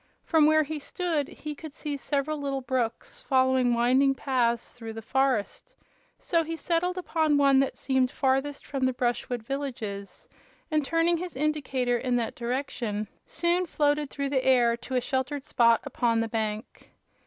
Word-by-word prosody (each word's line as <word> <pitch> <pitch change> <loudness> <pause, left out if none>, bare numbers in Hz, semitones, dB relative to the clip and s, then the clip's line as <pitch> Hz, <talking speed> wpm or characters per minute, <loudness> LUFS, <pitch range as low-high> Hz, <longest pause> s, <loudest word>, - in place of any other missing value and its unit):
From 315 -3 +4
where 310 0 +5
he 305 +1 -5
stood 315 -1 -2
he 305 -1 -7
could 300 0 -10
see 295 -2 -4
several 285 +2 -2
little 275 -1 -2
brooks 250 -3 -3
following 260 -2 +3
winding 260 +3 +3
paths 240 -3 0
through 225 -2 -8
the 225 - -7
forest, 265 - -1 0.4
so 335 -2 +1
he 330 +1 -4
settled 350 +2 -1
upon 315 -4 +1
one 275 -1 +5
that 275 - 0
seemed 260 -2 +1
farthest 270 +2 0
from 265 -2 0
the 260 - 0
brushwood 245 -1 -2
villages, 230 -7 -5 0.4
and 305 -1 +2
turning 330 +3 +2
his 355 +1 -6
indicator 265 -4 0
in 250 -1 0
that 235 -2 -1
direction 235 -4 -3 0.2
soon 345 +1 +1
floated 295 -1 +1
through 280 0 -3
the 265 -2 +1
air 245 -3 +4
to 250 +2 -6
a 250 - +2
sheltered 265 +2 -2
spot 235 -2 +4
upon 230 -2 0
the 225 - 0
bank. 220 -1 -4
270 Hz, 165 wpm, -27 LUFS, 245-300 Hz, 0.4 s, where